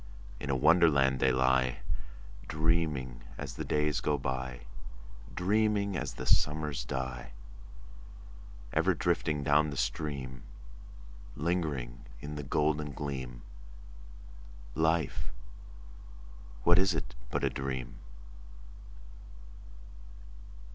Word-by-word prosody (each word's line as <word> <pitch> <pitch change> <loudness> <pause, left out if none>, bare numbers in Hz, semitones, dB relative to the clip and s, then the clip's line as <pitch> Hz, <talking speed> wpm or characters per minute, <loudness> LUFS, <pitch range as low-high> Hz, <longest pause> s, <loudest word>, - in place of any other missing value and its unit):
In - - -5
a 70 - +2
Wonderland 70 -3 +5
they 65 0 +4
lie, 65 -1 +2 0.7
Dreaming 75 -6 0 0.2
as - - -5
the - - -4
days 75 -1 +1
go 75 - +1
by, 65 -1 -3 0.7
Dreaming 100 +1 +2
as - - -3
the 65 - -5
summers 75 -2 +2
die: 65 -2 -4 1.4
Ever - - +3
drifting 75 -2 +1
down 75 +2 +4
the 70 - -5
stream— 65 -6 -2 0.9
Lingering 75 -8 -1 0.2
in 75 +1 -6
the 75 - -4
golden 75 +1 0
gleam— 65 -4 -5 1.3
Life, 80 -5 +1 1.3
what 85 +1 +6
is 95 -2 +3
it 80 - -3 0.2
but - - -1
a - - +2
dream? 65 -3 -4
70 Hz, 95 wpm, -31 LUFS, 65-80 Hz, 1.4 s, what